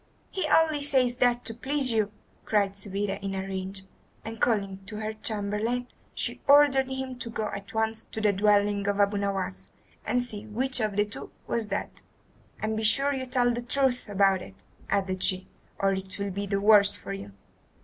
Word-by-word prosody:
"He 375 -5 -1
only 315 -2 +4
says 260 -4 +4
that 245 -1 +2
to 225 - -1
please 265 +3 0
you," 215 -2 +1 0.3
cried 205 -2 +1
Subida 200 0 -2
in 195 -1 -3
a 190 - -2
rage; 190 0 -3 0.4
and 225 0 -7
calling 200 -5 +1
to 210 - -7
her 215 0 -3
chamberlain, 215 +3 -1 0.3
she - - -3
ordered 280 -2 +6
him 265 -1 -5
to 240 - -2
go 220 -1 -3
at 200 +2 -8
once 220 0 -1
to - - -6
the 210 -2 +3
dwelling 205 0 +2
of 205 0 0
Abu 205 0 +3
Nowas 190 - -3 0.3
and 245 0 0
see 215 -2 -3
which 255 +4 0
of 215 -3 -1
the 205 0 +3
two 205 - -8 0.2
was 230 -2 -1
dead. 200 0 -3 0.7
"And 220 0 -1
be 220 - -2
sure 275 +6 +4
you 260 -1 -4
tell 245 -1 +2
the 240 - -3
truth 250 -1 0
about 195 -2 +3
it," 195 - -11 0.3
added 190 -2 0
she, 185 0 +3 0.3
"or 195 0 +2
it 190 0 -5
will 200 -1 -3
be 200 +2 -4
the 195 0 0
worse 205 -1 +6
for 100 - -6
you." 100 +1 -8
210 Hz, 190 wpm, -27 LUFS, 200-245 Hz, 0.7 s, ordered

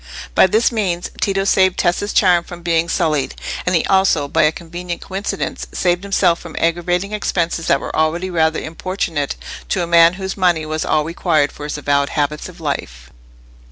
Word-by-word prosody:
By - - +6
this 220 +6 +2
means, 185 -6 -2
Tito 195 -1 +1
saved 190 -1 +3
Tessa's 180 +4 0
charm 180 -3 +4
from 175 0 -11
being 170 -1 +1
sullied; 150 -5 0 0.3
and 180 - +2
he 165 - +2
also, 190 -7 +2
by - - +1
a 155 0 +4
convenient 175 +1 -7
coincidence, 195 +1 -4
saved 175 -1 +1
himself 195 -4 +2
from 170 -2 -10
aggravating 175 +3 0
expenses 170 -5 -1
that 140 - +3
were - - -6
already 170 +4 0
rather 160 -2 +1
importunate 160 -3 -3 0.3
to 180 - 0
a - - -1
man 170 0 +5
whose 190 0 -4
money 175 -5 +2
was 155 0 -3
all 155 -1 +2
required 160 -2 +1
for 145 - -9
his 150 - -4
avowed 140 -1 +1
habits 150 +2 -2
of 180 0 -14
life. 65 - -5
170 Hz, 180 wpm, -18 LUFS, 155-185 Hz, 0.3 s, By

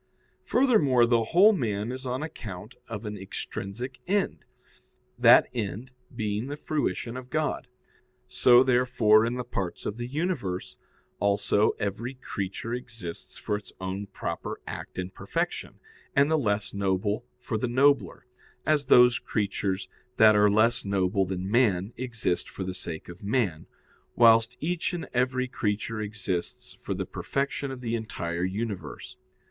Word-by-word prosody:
Furthermore, 155 - +4
the 115 -1 +2
whole 195 - +6
man 110 - -1
is 130 +1 -6
on 130 +3 -2
account 110 - -7
of 115 -1 -6
an 105 0 -4
extrinsic 100 +5 -6
end, 200 +1 0 0.7
that - - +8
end 115 +2 -4 0.2
being 105 +1 -2
the 145 +1 -5
fruition 125 -7 -2
of 130 0 -8
God. 155 -3 -1 0.6
So, 125 - +6
therefore, 120 -4 +4
in 120 - -2
the 125 - -3
parts 95 -6 -4
of 105 - -3
the 120 0 -4
universe 140 - -3 0.4
also 100 +1 +3
every 110 +5 -3
creature 110 -2 -5
exists 115 -8 -7
for 105 - -2
its 105 - -8
own 95 +2 -4
proper - - -5
act - - -7
and 90 +1 -4
perfection, - - -3 0.4
and 140 +3 +4
the - - +4
less 105 -8 0
noble 100 +3 0
for 120 -3 -3
the 125 - 0
nobler, 130 -5 +2 0.4
as 150 -2 +2
those 125 0 +6
creatures 100 -2 -2 0.3
that 110 -1 +7
are 105 0 +5
less 110 +3 +3
noble 95 0 +1
than 95 0 -3
man 105 -4 +2
exist 115 -8 -2
for 95 - -6
the 95 0 -4
sake 85 -3 -6
of 85 +1 -11
man, 100 -7 -1 0.5
whilst 115 +1 +5
each 175 +4 -1
and 175 - -4
every 130 +1 +1
creature 110 -2 -2
exists 100 -4 -4
for - - -5
the - - -3
perfection 140 0 -2
of 130 -1 -7
the 115 -2 -3
entire 85 -7 -3
universe. 95 -4 -4
115 Hz, 145 wpm, -27 LUFS, 100-125 Hz, 0.7 s, that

